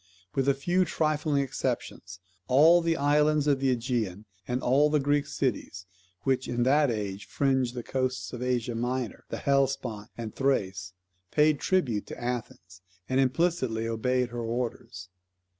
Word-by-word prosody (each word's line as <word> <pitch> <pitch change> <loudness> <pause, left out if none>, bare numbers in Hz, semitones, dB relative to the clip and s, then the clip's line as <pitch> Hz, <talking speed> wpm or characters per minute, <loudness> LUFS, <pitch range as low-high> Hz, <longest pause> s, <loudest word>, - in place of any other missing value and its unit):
With 135 0 +1
a 140 - +3
few 175 +6 +1
trifling 155 -4 0
exceptions, 90 -7 -4 0.3
all 160 +7 +6
the 165 -1 0
islands 150 +1 +3
of 140 -2 +2
the 135 0 +1
AEgean, 115 -5 -1 0.2
and 125 +1 -2
all 140 +4 +4
the 150 0 +2
Greek 145 +1 +1
cities, 110 -10 -3 0.4
which 130 -1 0
in 120 0 0
that 145 +3 +4
age 105 -3 -3
fringed 130 -3 0
the 120 - -4
coasts 130 0 -2
of 120 - -6
Asia 125 -2 -1
Minor, 125 0 -3
the - - -4
Hellespont, 130 -6 0
and 115 -2 -5
Thrace 95 -9 -1 0.4
paid 150 -1 +3
tribute 130 - 0
to - - -8
Athens, 110 -7 -5 0.3
and 130 - +1
implicitly 130 -5 +1
obeyed 125 +2 0
her 120 0 -5
orders. 115 -5 -4
130 Hz, 150 wpm, -28 LUFS, 115-145 Hz, 0.4 s, all